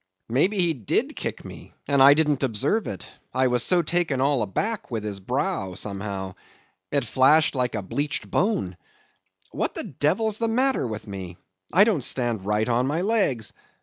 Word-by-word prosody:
Maybe 165 - +2
he 175 -3 +2
did 120 -9 -1
kick - - -5
me, - - -11
and 140 -1 +3
I 140 +2 +9
didn't 150 -3 +1
observe 135 - +1
it, 95 - -6 0.3
I 130 0 +3
was 125 -1 +1
so 175 +6 +2
taken 165 -4 0
all 140 0 +2
aback 205 - -2
with 115 -4 -3
his 105 -2 -4
brow, 125 - -2
somehow. 100 -1 -4 0.6
It - - +1
flashed 145 +4 +4
like 125 -3 -1
a 105 - -3
bleached 145 +10 -3
bone. 185 - 0 0.7
What - - -2
the - - 0
devil's 205 +8 0
the 230 - +1
matter 255 - +1
with 110 -1 -6
me? 95 -4 -7 0.3
I 185 +5 +6
don't 205 - +1
stand 120 -6 -1
right 105 +1 +1
on 125 +2 +1
my 155 +5 -1
legs. 185 - 0
135 Hz, 175 wpm, -24 LUFS, 105-175 Hz, 0.7 s, I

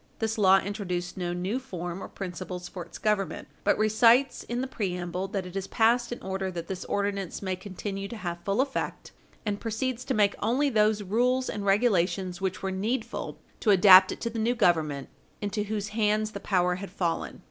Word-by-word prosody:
This 225 0 -2
law 190 -1 +7
introduces 185 -3 -3
no 180 -2 -2
new 185 +8 -2
form 180 -7 -6
or - - -6
principles 180 -1 -6
for 180 - -7
its - - -11
government, 210 -3 -1 0.2
but - - +3
recites, 230 +5 +4
in 240 +1 -3
the - - -1
preamble, 180 -6 -3
that 195 -1 -3
it 180 +1 -9
is 195 0 -3
passed 235 +2 +2
in 240 - -4
order 190 0 -2
that 170 -2 -5
this 185 +1 -5
ordinance 200 -2 -2
may 190 -1 -1
continue 195 +1 -5
to 230 - -7
have 175 -4 -5
full 200 +5 +1
effect, 270 0 -3 0.3
and 205 -1 -2
proceeds 240 +2 -2
to 265 - -1
make 205 -1 +4
only 275 +5 +2
those 215 -2 +3
rules 250 +6 +1
and 200 -1 -4
regulations 190 -3 +2
which 190 +1 -2
were 190 - -1
needful 225 +5 -3 0.2
to 220 - 0
adapt 190 -1 +8
it - - -6
to 230 - -2
the 225 - -4
new 235 +3 +1
Government, 160 - +1 0.3
into 205 0 -2
whose 210 0 -3
hands 215 0 +1
the 200 - -6
power 180 -3 +1
had 195 +1 -7
fallen. 175 -3 -2
200 Hz, 195 wpm, -28 LUFS, 185-220 Hz, 0.3 s, adapt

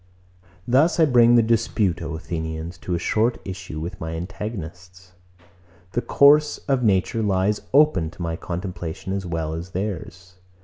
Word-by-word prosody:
110. 120 - -6
Thus 155 +7 +4
I 160 - +7
bring 120 -4 +5
the 120 - +5
dispute, 110 -6 +1
O 80 -1 -4
Athenians, 80 +1 -5
to 90 - -3
a - - 0
short 110 +7 +1
issue 95 -4 -6
with 85 +3 -6
my 80 0 -4
antagonists. 90 -1 -7 0.8
The 120 - -1
course 150 +3 +5
of 135 -3 +2
nature 105 0 +1
lies 100 0 +1
open 140 - +4
to 85 - -12
my 85 -1 -2
contemplation 90 0 -5
as 95 -2 -3
well 80 -2 -3
as 85 +2 -5
to 95 - -23
theirs. 90 -2 -5
95 Hz, 165 wpm, -23 LUFS, 85-115 Hz, 0.8 s, I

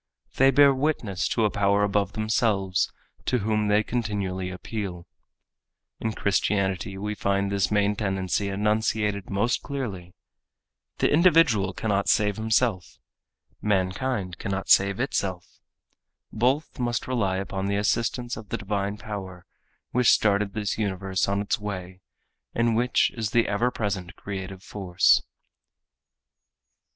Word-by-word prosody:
They 135 +1 +6
bear 140 +1 +6
witness 130 -9 -1
to 115 - +1
a 105 - +1
power 100 0 +2
above 100 -1 0
themselves 105 -4 +1 0.3
to 125 - +1
whom 105 -1 0
they 105 +1 +3
continually 100 -6 -2
appeal. 90 -2 -5 0.9
In 110 -1 -2
Christianity 95 -2 0
we 105 +2 -3
find 100 -1 0
this 100 -1 +1
main 105 0 +2
tendency 95 -1 -1
enunciated 105 0 0
most 105 +5 0
clearly. 100 -11 -5 0.8
The - - +2
individual 160 - +4
cannot 100 -2 -1
save 105 -2 +2
himself. 110 -3 0 0.6
Mankind 95 0 -1
cannot 95 0 -3
save 100 +1 +5
itself. 95 -8 -3 0.7
Both 130 +8 0
must 120 -2 -1
rely 105 -7 0
upon 95 0 -3
the 100 - 0
assistance 120 +4 0
of 110 -2 -10
the - - -2
divine 100 0 -2
power 95 -4 -7 0.5
which 125 -1 +3
started 100 -1 +3
this 105 0 -2
universe 95 -2 -1
on 100 +1 0
its 100 - -1
way 95 -3 -6 0.5
and 115 -1 +2
which 125 +2 +2
is 110 -3 -2
the 115 +2 +2
ever 115 +5 +1
present 100 -6 -3
creative 95 -1 -7
force. 95 -3 +3
100 Hz, 125 wpm, -25 LUFS, 95-110 Hz, 0.9 s, They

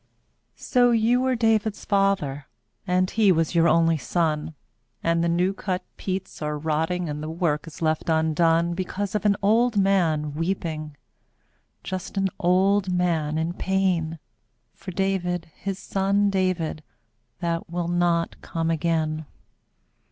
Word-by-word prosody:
lO 245 -2 +6
you 235 +2 +3
were 260 0 +1
David's 220 -2 +1
father, 195 -9 +1 0.4
And 185 0 +1
he 215 -3 +4
was 165 -2 +1
your 170 -1 +4
only 165 0 +3
son, 155 +2 -1 0.5
And 165 0 +2
the 170 - +1
new 180 +3 +1
cut 185 -1 -3
peats 190 -2 -5
are 150 0 -2
rotting 160 +3 -1
And 150 0 -4
the 155 - -5
work 160 -2 -1
is 165 +1 -8
left 155 +1 0
undone. 165 +1 +2
Because 190 +2 -3
of 210 0 -2
an 200 - +4
old 225 +2 +3
man 170 -7 +2
weeping, 155 -3 -3 0.9
Just 185 +1 -5
an 195 0 +2
old 190 +2 +3
man 165 -4 0
in 165 +2 -1
pain. 180 -4 0 0.6
For - - -10
David, 180 -3 -1
his 195 -1 -5
son 200 +1 +1
David, 185 -5 -1 0.6
That 170 -2 -2
will 175 0 -2
not 175 -1 0
come 165 0 -2
again. 160 -1 -1
175 Hz, 135 wpm, -24 LUFS, 160-195 Hz, 0.9 s, lO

